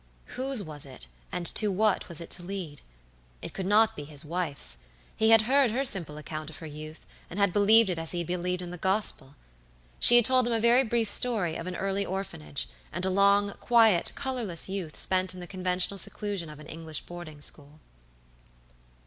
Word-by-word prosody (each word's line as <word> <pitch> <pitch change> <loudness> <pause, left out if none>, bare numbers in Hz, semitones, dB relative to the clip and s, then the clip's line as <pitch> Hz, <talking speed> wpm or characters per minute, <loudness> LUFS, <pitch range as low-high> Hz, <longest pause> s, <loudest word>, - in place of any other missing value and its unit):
Whose 260 -4 -2
was 150 -4 -4
it, 130 - -8 0.3
and 175 - -4
to 210 -2 +4
what 205 +1 0
was 170 - +1
it 170 - -7
to 175 - -1
lead? 175 -5 -6 0.6
It - - -6
could 190 -1 -4
not 220 +2 +3
be 145 - -7
his 150 +1 -7
wife's; 150 - -1 0.4
he 220 - +2
had 225 -1 +6
heard 265 +2 +3
her 260 +5 -1
simple 170 - +3
account 155 0 -7
of 160 - -10
her 160 - -10
youth, 155 +1 -10 0.2
and 175 - -8
had 200 -3 +2
believed 215 +2 +5
it 180 -3 -2
as 165 -1 -5
he 175 - -2
had 170 - -2
believed 180 +1 -3
in 175 - -7
the 180 - -7
Gospel. 190 -8 0 0.6
She 240 - +8
had 240 -2 +6
told 255 -1 +3
him 240 - -1
a 225 - +1
very 235 +3 +4
brief 230 -2 -1
story 205 -7 +3
of 165 - -6
an 180 - -5
early 195 +1 -2
orphanage, 125 - -3 0.2
and 180 - -3
a 190 - 0
long, 200 +1 +3
quiet, 225 -7 +4
colorless 240 -11 -2
youth 190 -5 -5
spent 185 -1 0
in - - -9
the 175 - -7
conventional 185 +1 -1
seclusion 195 -3 -2
of 150 - -10
an 150 - -12
English 160 -1 -5
boarding 175 -4 -10
school. 145 +1 -5
185 Hz, 200 wpm, -27 LUFS, 160-215 Hz, 0.6 s, She